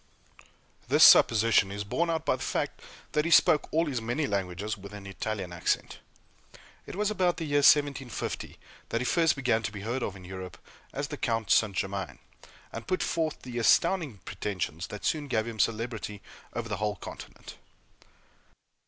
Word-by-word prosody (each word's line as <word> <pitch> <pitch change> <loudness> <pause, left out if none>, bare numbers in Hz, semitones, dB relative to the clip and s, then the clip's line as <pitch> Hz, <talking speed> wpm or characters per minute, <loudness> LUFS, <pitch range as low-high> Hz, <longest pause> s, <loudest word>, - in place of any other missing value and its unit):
This - - +5
supposition 110 -3 +6
is 100 +1 -4
borne 165 +12 -1
out 160 -1 -1
by - - +2
the - - -11
fact - - -2 0.3
that 150 - +1
he 165 - -1
spoke 155 -2 +5
all 165 +2 +2
his 130 -6 -2
many 120 +7 -1
languages 100 -1 -2
with 100 +1 -11
an 100 -1 -10
Italian 95 -2 -4
accent. 85 - -1 0.9
It - - -7
was 210 +1 0
about 180 -3 +1
the 165 - -3
year 145 -1 +1
1750 140 -3 +2 0.3
that 115 - 0
he 125 - -2
first 165 +2 +3
began 125 -5 +1
to 100 - -3
be 100 -1 -7
heard 120 +5 -3
of 100 - -3
in 95 -2 -12
Europe 95 0 -8 0.3
as 140 0 -4
the - - -5
Count 115 -5 -1
St. 105 -3 +3
Germain, 95 0 -3 0.6
and - - -7
put 185 - 0
forth 160 -2 -2
the 120 -1 -5
astounding 150 - +3
pretensions 90 -4 -4
that 105 - -8
soon 150 -2 0
gave 110 -4 0
him 115 -2 -7
celebrity 110 -3 -2 0.3
over 120 -1 -3
the 105 -3 -3
whole 105 +1 -1
continent. - - -10
115 Hz, 175 wpm, -28 LUFS, 100-145 Hz, 0.9 s, supposition